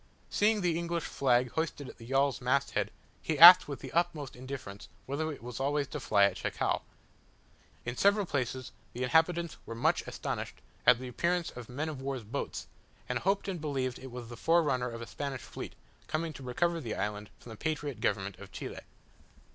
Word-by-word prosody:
Seeing 210 0 +3
the 170 -2 +1
English 170 -1 -2
flag 125 -2 +2
hoisted 160 -3 -2
at - - -11
the 115 - -11
yawl's 135 +1 +2
mast 130 +2 +1
head, - - 0 0.3
he 155 - -1
asked 175 +4 +12
with 140 -2 -6
the - - -7
utmost 165 -5 0
indifference, 125 -6 -7 0.2
whether 155 +4 -2
it 140 - -9
was 125 0 -6
always 145 +1 +1
to 150 - -4
fly 105 -5 +3
at 100 - +3
Chacao. - - -1 1.0
In 120 +1 -3
several 200 +6 +4
places 130 -4 -2 0.2
the 125 - -3
inhabitants 165 +4 +2
were 115 - -5
much 115 - +2
astonished - - -4 0.3
at 125 -1 +8
the 130 +1 -7
appearance 170 +7 0
of 125 -2 -9
men 145 +6 -3
of 150 -4 -5
war's 135 -3 -3
boats, 105 - -4 0.4
and - - -1
hoped 195 +2 0
and 185 -5 -3
believed 135 -4 -2
it 130 - -8
was 120 -1 -7
the 120 - -8
forerunner 150 -7 +2
of 115 0 -6
a - - -6
Spanish 140 +1 -5
fleet, - - -8 0.3
coming 160 0 -2
to 140 - -10
recover 165 +7 0
the 115 -6 -4
island 105 +1 -3
from 120 - -12
the - - -7
patriot 145 -3 -3
government 100 -2 -1
of - - -11
Chile. - - -6
140 Hz, 195 wpm, -31 LUFS, 125-165 Hz, 1.0 s, asked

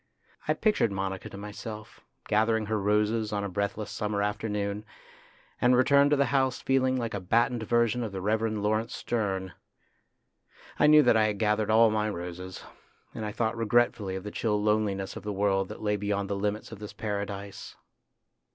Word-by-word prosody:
I - - +2
pictured 215 - +2
Monica 95 -1 -3
to - - -9
myself, 105 +1 -8 0.3
gathering 110 +1 +2
her 110 -1 -1
roses 105 +2 +1
on 100 -1 -1
a - - -1
breathless 100 +2 -3
summer 105 -1 -1
afternoon, 105 0 -2 0.8
and 125 +1 +5
returned 140 +3 +5
to 145 - +4
the 140 - +3
house 130 -2 +2
feeling 130 -1 +2
like 115 -2 -3
a 100 - -2
battened 115 +5 +1
version 120 +1 +1
of 110 -3 -3
the 95 - -5
Reverend 110 +1 0
Laurence 110 +2 0
Sterne. 95 -5 -2 1.3
I 150 - +6
knew 150 0 +8
that 120 - +4
I 110 - +4
had 105 -1 -1
gathered 105 0 +1
all 110 0 +6
my 105 0 0
roses, 90 0 -6 0.5
and 110 - -5
I 105 - -3
thought 115 +1 -1
regretfully 115 -4 +1
of 95 - -5
the 105 - -6
chill 105 -1 0
loneliness 105 -2 0
of - - -6
the 105 - -4
world 95 -1 +1
that - - -8
lay 105 -1 +1
beyond 100 -1 -2
the - - 0
limits 105 +3 -2
of 110 - -9
this 105 -1 -8
paradise. 100 -2 -5
105 Hz, 180 wpm, -28 LUFS, 100-115 Hz, 1.3 s, knew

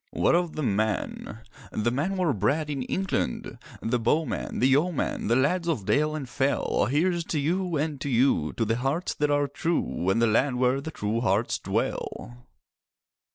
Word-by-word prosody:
What - - +2
of 175 -1 +1
the 155 - -2
men? 110 0 -2 0.3
The 115 +2 0
men 165 +10 -1
were 175 -6 +2
bred 145 +10 0
in 140 -2 -2
England: 125 - -2 0.2
The 120 +2 +1
bowmen—the 130 +1 0
yeomen, 150 +5 +1
The 115 - +3
lads 170 +7 +1
of 140 - -1
dale 150 +6 +2
and 145 -4 -5
fell. 135 +3 0
Here's 170 +5 +1
to 155 - -1
you—and 155 -2 -1
to 145 - -2
you! 120 - +2
To 115 - -1
the 115 +2 0
hearts 135 +8 -1
that 150 0 0
are 145 0 +2
true 140 - -1
And 95 - +2
the 115 - +4
land 125 +4 +2
where 130 +2 +2
the 160 - -5
true 110 -5 -2
hearts 110 0 +1
dwell. 120 +1 -3
140 Hz, 170 wpm, -26 LUFS, 115-155 Hz, 0.3 s, the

